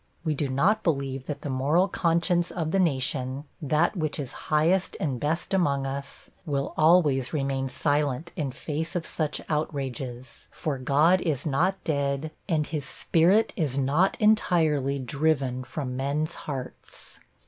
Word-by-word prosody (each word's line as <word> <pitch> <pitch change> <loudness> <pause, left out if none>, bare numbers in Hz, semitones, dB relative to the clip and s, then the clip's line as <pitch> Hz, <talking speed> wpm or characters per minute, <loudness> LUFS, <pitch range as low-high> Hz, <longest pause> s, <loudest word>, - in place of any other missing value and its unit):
We 155 -2 0
do 145 -1 -2
not 185 +12 +2
believe 135 -6 -1
that 145 -1 -4
the 145 - -3
moral 145 +8 +2
conscience 170 0 +1
of 160 -3 -3
the 195 - +2
nation 135 -4 0 0.2
that 155 +6 +2
which 155 -5 -2
is 140 -2 -5 0.2
highest 165 +5 +2
and 130 -5 -1
best 160 +7 -1
among 140 -8 +2
us 140 +1 -6
will 140 -4 -2
always 155 -6 +4
remain 135 -2 -1
silent 145 +3 0
in 145 -4 -2
face 155 +6 -4
of 170 -2 -1
such 155 -3 -2
outrages, 130 -5 -4
for 145 -4 -3
God 150 +8 +4
is 150 -5 -1
not 170 +7 +1
dead, 140 0 -1 0.2
and 155 -3 +2
His 150 -3 -3
Spirit 180 +7 +2
is 145 -7 -1
not 145 +8 +2
entirely 160 - +3
driven 135 -1 0
from 130 -1 -5
men's 145 +5 -1
hearts. 135 -4 -7
150 Hz, 150 wpm, -26 LUFS, 135-165 Hz, 0.2 s, always